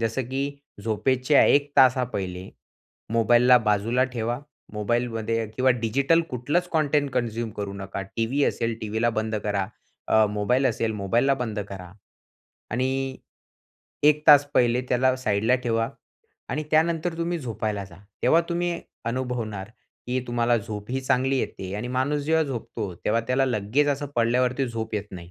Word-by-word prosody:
जसं 115 +3 -1
की 140 +1 -3 0.2
झोपेच्या 130 +5 +3
1 145 0 +3
तासा 130 0 +6
पहिले 95 -5 -5 0.6
मोबाईलला 120 +2 +5
बाजूला 110 +3 +1
ठेवा. 120 0 -3 0.3
मोबाईलमध्ये 115 +1 -1
किंवा 130 0 +3
डिजिटल 130 +7 +2
कुठलंच 145 +9 -1
कॉटेंट 150 -3 +1
कन्झ्युम 115 -2 -1
करू 100 -1 -3
नका. 100 0 -5
टीव्ही 115 +8 -1
असेल 115 -1 -1
टीव्हीला 110 +2 0
बंद 110 -1 -2
करा, 100 -2 0 0.4
अ, 110 -1 +5
मोबाईल 115 +6 +1
असेल 115 -2 0
मोबाईलला 115 +7 +1
बंद 115 -5 -4
करा 90 -2 -9 0.8
आणि 130 +2 -1 0.9
1 150 0 +5
तास 145 -2 +8
पहिले 120 0 +3
त्याला 130 +1 +3
साइडला 110 -1 +1
ठेवा 115 -1 +1 0.6
आणि 150 +5 -1
त्यानंतर 165 +1 +1
तुम्ही 170 +1 -1
झोपायला 110 -6 -3
जा. 85 -3 -14 0.3
तेव्हा 165 - +5
तुम्ही 175 0 -1 0.3
अनुभवणार, 115 -5 -3 0.4
की 130 +1 0
तुम्हाला 120 0 +2
झोपही 110 +3 -5
चांगली 130 0 +1
येते, 95 -5 -4
आणि 115 +4 -4
माणूस 130 +4 0
जेव्हा 160 +1 +3
झोपतो, 115 -7 -5
तेव्हा 115 +2 +2
त्याला 130 +1 +3
लगेच 120 +5 +1
असं 145 0 -1
पडल्यावरती 125 +3 +2
झोप 110 -1 -4
येत 105 -1 -2
नाही. 90 -2 -10
120 Hz, 140 wpm, -25 LUFS, 110-135 Hz, 0.9 s, तास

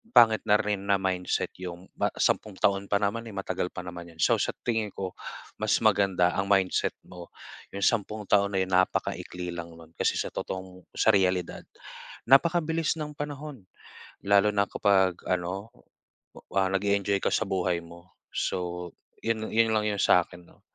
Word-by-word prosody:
pangit 110 -2 +6
na 105 - +6
rin 105 -2 -2
na 100 - +5
mindset 95 -1 -1
'yong 90 0 -7
pa - - +1
sampung 105 -3 +1
taon 100 0 +2
pa - - +4
naman 105 +3 0
eh, - - -10
matagal 95 -2 -2
pa 90 - -5
naman 85 -1 -8
'yon. - - -24
So - - +4
sa - - 0
tingin 110 -3 0
ko, 95 -1 -4 0.5
mas - - +3
maganda 95 -3 +3
ang 100 - -1
mindset 95 -2 +2
mo, 90 -1 -10 0.5
'yong 100 - -3
sampung 110 -1 0
taon 100 -1 +3
ay 95 - +3
napakaikli 90 -1 -1
lang 85 -1 -7
no'n. 80 -1 -15
Kasi - - +1
sa - - -2
totoong 95 -1 -6
sa 110 - +4
realidad, 90 -3 +1 0.6
napakabilis 165 +4 +3
ng 150 -1 -4
panahon. 145 -6 -6 0.6
Lalo 100 +1 +5
na 100 -1 +1
kapag 95 -3 +2
ano, 90 +4 -2 0.8
ah, 95 -1 +3
nag-eenjoy 100 0 +1
ka - - +1
sa 110 - +1
buhay 90 -3 0
mo. 85 +1 -15 0.2
So 90 -1 -3 0.3
'yon 110 -1 -1
'yon 115 0 +3
lang 105 -1 +1
'yung 100 -1 -1
sa'kin 90 0 +3
'no. - - -23
95 Hz, 165 wpm, -27 LUFS, 90-105 Hz, 0.8 s, pangit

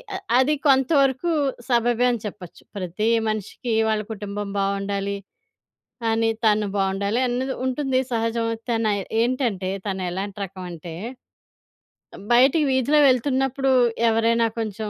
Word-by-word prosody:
అ - - -1 0.2
అది 285 +4 +3
కొంతవరకు 270 +2 +3 0.4
సబబే 240 0 +2
అని 240 - -2
చెప్పొచ్చు. 190 -4 -9
ప్రతి 185 +2 -2 0.2
మనిషికి 215 +3 -4 0.2
వాళ్ళ 215 -1 +1
కుటుంబం 205 -1 -5
బాగుండాలి, 200 0 -1 0.9
అని 225 0 +2
తను 210 -1 +3
బాగుండాలి 195 +3 0
అన్నది 255 +2 -2
ఉంటుంది 260 0 0
సహజం 230 0 0 0.2
తనై 225 -3 +1 0.2
ఏంటంటే 235 -7 0 0.2
తనేలాంటి 190 +1 -3
రకమంటే, 175 -3 -8 1.4
బయటికి 265 +6 +5
వీధిలో 260 +3 +3
వెళ్తున్నప్పుడు 270 +1 +1 0.4
ఎవరైనా 230 +1 +2
కొంచెం 215 -1 -4
225 Hz, 105 wpm, -23 LUFS, 200-255 Hz, 1.4 s, బయటికి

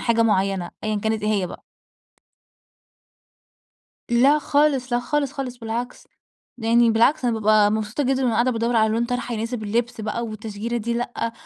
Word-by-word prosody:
حاجة 230 -1 +2
مُعينّة. 195 -4 +1
أيًا 215 -1 0
كانت 220 +1 -1
إيه 210 - 0
هي 195 -3 0
بقى. - - -10 2.5
لا 265 +5 +5
خالص، 285 -4 +1
لا 240 - +2
خالص 280 +2 -1
خالص، 260 -3 -5
بالعكس. 235 +1 -5 0.5
يعني 230 0 +3
بالعكس 235 +5 +3
أنا 240 - +2
بابقى 215 -1 +4
مبسوطة 215 +5 -2
جدًا 265 +1 +1
وأنا 245 -3 +1
قاعدة 245 +2 +2
بادّور 235 0 0
على 220 0 +4
لون 230 +1 +1
طرحة، 245 -1 -3
يناسب 225 +1 -4
اللبس 235 +3 -2
بقى 220 +2 -3
والتشجيرة 220 +2 -5
دي 235 +1 -2
لأ، 235 -1 -3
230 Hz, 160 wpm, -22 LUFS, 215-245 Hz, 2.5 s, لا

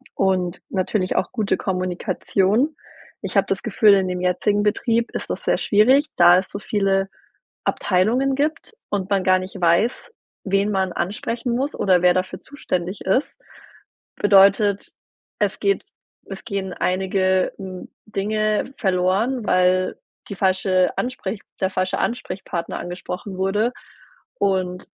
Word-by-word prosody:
und 185 -2 0
natürlich 185 0 -1
auch - - 0
gute 215 -5 0
Kommunikation. 190 - 0 0.5
Ich - - -5
habe - - +3
das - - -2
Gefühl, 210 -2 +4
in 190 -1 +1
dem 180 0 -3
jetzigen 205 +3 +1
Betrieb 230 +3 +1
ist - - -5
das - - -5
sehr - - +2
schwierig, 255 +8 +4
da 175 +1 +7
es 190 - -6
so 200 - -6
viele 195 -2 0 0.6
Abteilungen 230 +8 +1
gibt 305 +9 -2 0.2
und 195 -2 -2
man 195 -2 +1
gar 185 0 +4
nicht 185 +1 -8
weiß, 175 - +1 0.3
wen 195 +1 +1
man 190 -2 0
ansprechen 230 +6 -2
muss 275 +4 -1
oder 185 -3 +3
wer 180 0 +6
dafür 185 0 -2
zuständig 185 - -4
ist. 195 +10 0 0.8
Bedeutet, 200 0 +4 0.5
es - - 0
geht 400 0 +1 0.5
es 195 -1 -8
gehen 195 -4 -3
einige, 185 0 +1
hm, 185 -2 -8 0.2
Dinge 215 +4 -1
verloren, 195 +6 +1
weil 185 0 +2 0.3
die 200 - -5
falsche 185 -1 +1
Ansprech 225 -5 -3 0.2
der 190 - +2
falsche 185 0 -1
Ansprechpartner 190 -7 -3
angesprochen 180 +2 -6
wurde 210 +6 +1 0.7
und 185 -2 0
195 Hz, 135 wpm, -22 LUFS, 185-215 Hz, 0.8 s, da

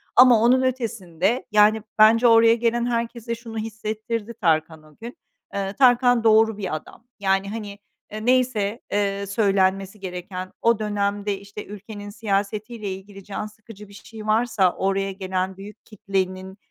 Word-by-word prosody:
ama 245 -3 +7
onun 250 +3 +4
ötesinde, 230 -5 -1
yani, 210 +1 +5 0.2
bence 225 +3 +6
oraya 230 0 +6
gelen 235 0 0
herkese 235 -1 -2
şunu 230 -1 -9
hissettirdi 220 +1 -4
Tarkan 160 -6 0
o 155 -1 -20
gün: 235 +3 -10 0.4
Eee, 195 0 -3
Tarkan 245 -1 +4
doğru 220 -1 +4
bir 190 -6 -3
adam. 155 +8 -10 0.2
Yani, 195 0 +1
hani, 205 -2 -7 0.3
eee, 215 +1 -6
neyse, 245 -4 +1
eee, 200 -1 0
söylenmesi 195 -1 +1
gereken, 185 0 -6
o 230 -1 +3
dönemde, 205 -1 -1
işte, 200 +1 -9
ülkenin 205 0 -9
siyasetiyle 210 +1 -3
ilgili 195 +1 -11
can 205 +2 -5
sıkıcı 215 -1 -13
bir 200 - -16
şey 215 +1 -11
varsa 215 -4 +2
oraya 195 0 -1
gelen 190 -1 -3
büyük 205 +3 -12
kitlenin, 190 -2 -3
210 Hz, 145 wpm, -23 LUFS, 195-230 Hz, 0.4 s, ama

